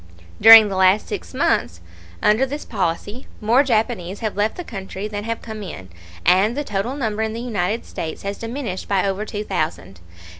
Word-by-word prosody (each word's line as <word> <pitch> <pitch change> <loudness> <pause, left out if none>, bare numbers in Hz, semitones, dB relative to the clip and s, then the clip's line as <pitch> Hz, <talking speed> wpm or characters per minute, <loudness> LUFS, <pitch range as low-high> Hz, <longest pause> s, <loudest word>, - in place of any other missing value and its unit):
During 225 0 +10
the 195 - -4
last 190 +2 +4
six - - -6
months 85 +1 0 0.4
under 215 +5 +4
this 285 +3 -4
policy 190 +7 -3
more 235 +5 +4
Japanese 220 -7 -1
have 215 -2 -2
left 210 +2 0
the 355 - -5
country 195 - -6
than 205 0 -5
have 230 0 -4
come 220 -2 -7
in, 95 - -8 0.4
and 205 +7 +3
the 290 - -1
total 210 +2 -3
number 220 -6 -2
in 220 0 -1
the 230 - -5
United 220 -2 -2
States 160 -1 -6
has 200 0 -4
diminished 230 -5 -5
by 195 -2 +1
over 195 +2 -2
two 210 0 -5
thousand. 95 - -3
210 Hz, 185 wpm, -21 LUFS, 190-230 Hz, 0.4 s, During